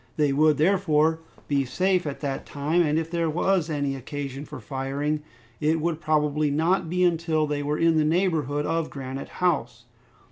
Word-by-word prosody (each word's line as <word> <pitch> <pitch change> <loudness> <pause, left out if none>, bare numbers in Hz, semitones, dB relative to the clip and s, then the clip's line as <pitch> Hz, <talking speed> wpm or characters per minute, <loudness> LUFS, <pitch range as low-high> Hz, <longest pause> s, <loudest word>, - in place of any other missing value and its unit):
They 145 -3 +2
would, 150 +1 +4
therefore, 160 -2 +3 0.3
be 140 -1 +1
safe 185 +5 0
at 140 - -5
that 140 -2 -3
time, 150 +5 0
and 155 -2 +2
if 165 0 -2
there 170 -2 0
was 175 +1 +1
any 145 -3 -1
occasion 140 +1 -6
for - - -9
firing, 140 +3 -2 0.4
it 155 +1 +1
would 165 0 -2
probably 150 -1 +1
not 165 +4 +1
be 180 +1 +1
until 165 -3 +2
they 145 -1 -2
were 145 +1 -1
in 165 -1 +3
the 155 - +4
neighborhood 155 -4 +1
of 165 -1 -1
Granite 135 -1 -6
House. 125 -10 -1
155 Hz, 175 wpm, -25 LUFS, 145-165 Hz, 0.4 s, would